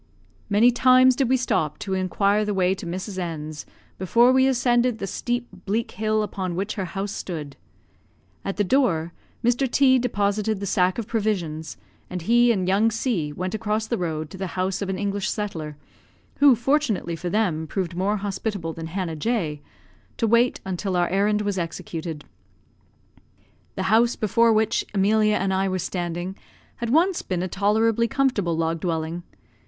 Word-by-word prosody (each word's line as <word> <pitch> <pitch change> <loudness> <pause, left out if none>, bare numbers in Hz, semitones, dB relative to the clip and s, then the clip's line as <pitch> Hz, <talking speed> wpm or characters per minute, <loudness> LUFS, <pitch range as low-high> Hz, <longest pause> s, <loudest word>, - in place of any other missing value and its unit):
Many 220 +4 +5
times 255 +1 +5
did 260 -2 +1
we 260 - +4
stop 190 - 0
to 195 - -4
inquire 200 +3 +1
the 210 -1 -2
way 185 0 +2
to 190 -2 -7
Mrs. 185 +2 -5
N 155 -3 -4
's, 150 - -9 0.3
before 235 +7 +4
we 260 0 +4
ascended 245 -2 +2
the 195 - -4
steep, 240 +4 -3 0.2
bleak 225 +4 -1
hill 215 0 0
upon 185 -3 -4
which 195 +4 -2
her 195 -4 -3
house 195 +2 -4
stood. 155 -9 -6 0.9
At 195 - -4
the 205 - +2
door, 180 - +1 0.3
Mr. 245 +3 +2
T 260 0 +4
deposited 210 -3 0
the 200 - -4
sack 180 -1 +1
of 230 - -3
provisions, 180 -9 -2 0.3
and 180 -2 -5
he 240 +4 +4
and 190 -5 0
young 200 +4 +3
C 220 - -1
went 185 +5 -4
across 220 0 -1
the 235 +1 -2
road 155 -3 -3
to 190 - -10
the 190 - -2
house 185 +2 -1
of 200 - -3
an 190 - -2
English 200 0 -2
settler 160 -8 -4 0.6
(who, 280 -3 +7
fortunately 240 - 0
for 175 +2 -4
them, 175 -6 0
proved 180 0 -3
more 200 +4 0
hospitable 200 -4 -3
than 165 0 -6
Hannah 175 -1 -3
J 155 -5 -2 0.3
), - - -34
to 230 - +1
wait 235 +3 +3
until 190 0 -2
our 175 -1 +2
errand 210 +2 +1
was 200 -2 -1
executed. 165 -2 -5 1.5
The - - -2
house 235 +2 +4
before 230 +2 +3
which 220 0 +2
Emilia 210 +2 +3
and 190 -1 0
I 190 +1 +1
were 185 - -1
standing 175 +1 -3 0.4
had 235 - -3
once 340 +8 +3
been 180 -2 -2
a - - -1
tolerably 220 +4 +2
comfortable 220 - 0
log 165 0 0
dwelling. 165 0 -2
200 Hz, 175 wpm, -24 LUFS, 175-225 Hz, 1.5 s, who